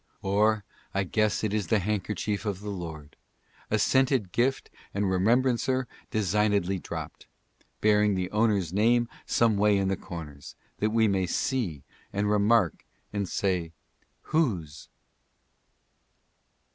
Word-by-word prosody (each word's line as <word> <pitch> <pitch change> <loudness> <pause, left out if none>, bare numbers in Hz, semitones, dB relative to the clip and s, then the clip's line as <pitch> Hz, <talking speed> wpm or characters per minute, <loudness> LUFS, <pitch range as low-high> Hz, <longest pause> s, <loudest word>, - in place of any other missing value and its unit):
" - - -39
Or 105 +2 +2 0.3
I 100 - +2
guess 110 +3 0
it 105 -2 0
is 105 -4 -1
the 110 - +3
handkerchief 105 +1 -2
of 100 -3 -3
the 105 0 -5
Lord, 80 -6 -7 0.5
A 110 - +2
scented 130 -1 +2
gift 130 +6 0 0.2
and 100 0 +1
remembrancer 125 +6 +2 0.2
designedly 100 -2 +1
dropt, - - -7 0.5
Bearing 105 -1 +4
the 90 0 -2
owner's 105 -6 +1
name 120 +4 +3 0.2
someway 105 -3 +3
in 95 -1 +1
the 95 - +1
corners, 80 -7 -9 0.2
that 105 - +2
we 110 0 +3
may 95 -2 +1
see 90 - -1 0.3
and 100 +1 0
remark, 105 -3 +3 0.3
and 100 -3 -2
say 90 -4 -1 0.6
Whose?''' 90 - 0
105 Hz, 125 wpm, -27 LUFS, 95-110 Hz, 0.6 s, Bearing